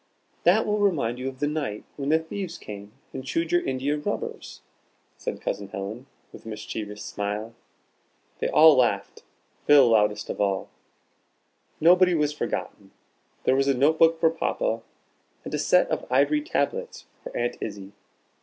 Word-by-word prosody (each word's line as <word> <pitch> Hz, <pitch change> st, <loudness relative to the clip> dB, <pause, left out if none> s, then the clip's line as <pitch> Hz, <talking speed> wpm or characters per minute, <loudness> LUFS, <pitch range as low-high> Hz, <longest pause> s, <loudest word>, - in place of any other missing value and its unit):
"That 190 Hz, +6 st, +5 dB
will 210 Hz, 0 st, 0 dB
remind 145 Hz, -, +1 dB
you 130 Hz, +1 st, -2 dB
of 130 Hz, -, -11 dB
the 145 Hz, -, +1 dB
night 145 Hz, -9 st, -3 dB
when 140 Hz, -1 st, -3 dB
the 160 Hz, -, +5 dB
thieves 170 Hz, +2 st, -5 dB
came 100 Hz, 0 st, -9 dB, 0.2 s
and 130 Hz, -, -5 dB
chewed 165 Hz, +5 st, -2 dB
your 175 Hz, -, +3 dB
india 135 Hz, +3 st, -1 dB
rubbers," 150 Hz, -, -5 dB, 0.5 s
said -, -, -5 dB
Cousin 100 Hz, -1 st, -3 dB
Helen, 100 Hz, +7 st, -6 dB, 0.3 s
with -, -, -12 dB
a -, -, -13 dB
mischievous 105 Hz, -1 st, -6 dB
smile. 105 Hz, +2 st, -4 dB, 0.9 s
They -, -, 0 dB
all 155 Hz, -1 st, +7 dB
laughed, 110 Hz, -6 st, 0 dB, 0.5 s
Phil 140 Hz, -4 st, +7 dB
loudest 105 Hz, -1 st, +2 dB
of -, -, -4 dB
all. 100 Hz, -2 st, 0 dB, 1.1 s
Nobody 180 Hz, +2 st, +5 dB
was 150 Hz, -2 st, +1 dB
forgotten. 150 Hz, -, -4 dB, 0.5 s
There 130 Hz, -, +3 dB
was 135 Hz, +1 st, +2 dB
a 140 Hz, -, +3 dB
notebook 160 Hz, +4 st, +4 dB
for 165 Hz, -1 st, +4 dB
Papa, -, -, -1 dB, 0.6 s
and -, -, -6 dB
a -, -, 0 dB
set -, -, +4 dB
of -, -, -3 dB
ivory 300 Hz, 0 st, +3 dB
tablets 470 Hz, +9 st, -2 dB, 0.2 s
for -, -, -6 dB
Aunt 120 Hz, 0 st, -1 dB
Izzie. 100 Hz, -2 st, -6 dB
135 Hz, 155 wpm, -25 LUFS, 105-165 Hz, 1.1 s, all